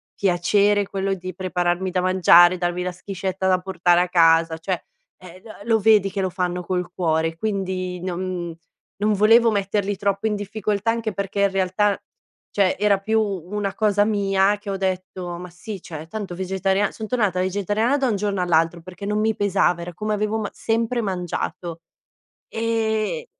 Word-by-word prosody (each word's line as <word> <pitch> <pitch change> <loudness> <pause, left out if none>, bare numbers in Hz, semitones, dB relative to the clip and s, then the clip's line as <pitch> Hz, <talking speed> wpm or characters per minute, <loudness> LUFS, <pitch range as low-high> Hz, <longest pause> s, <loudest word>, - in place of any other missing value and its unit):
piacere 200 +2 +2
quello 195 0 -2
di 185 -1 -7
prepararmi 180 0 -1
da 185 - 0
mangiare, 180 -1 +6
darmi 175 0 -1
la 180 0 -3
schiscetta 190 0 -4
da 185 -1 +3
portare 180 -2 +2
a 180 - +2
casa, 165 -2 +4
cioè, 170 +2 -3 0.4
eh, 185 0 -13
lo 225 - -10
lo 225 -1 +3
vedi 210 -2 +4
che 195 - -3
lo 190 - 0
fanno 180 0 -2
col 180 0 -2
cuore, 165 -1 0
quindi 185 -2 -3
non 180 -1 -4 0.5
non 210 +1 +2
volevo 225 +3 +5
metterli 200 0 -1
troppo 200 +2 0
in 210 - 0
difficoltà 210 +1 -1
anche 230 -1 -2
perché 200 0 -3
in 200 -1 +3
realtà, 195 +2 +1 0.5
cioè 195 -2 +2
era 205 -1 +3
più 220 +3 +1
una 200 0 -3
cosa 205 0 +2
mia 200 -1 +2
che 205 0 -9
ho 195 - -2
detto: 185 -2 -3
"Ma 180 +1 -8
sì, 180 +2 -8
cioè 160 -1 -8
tanto 200 -1 -6
vegetaria" 190 +2 0
son 220 - -7
tornata 210 -7 0
vegetariana 205 +7 0
da 270 -2 +1
un 215 - +1
giorno 200 -1 -1
all'altro 165 -1 +1
perché 185 +3 -9
non 210 +1 0
mi 220 0 +1
pesava 190 -3 +1
era 175 +1 -7
come 215 0 -2
avevo 210 +1 -1
ma 215 - -3
sempre 230 +2 -1
mangiato, 175 -3 -4 0.7
e 225 - -1
195 Hz, 170 wpm, -22 LUFS, 180-210 Hz, 0.7 s, mangiare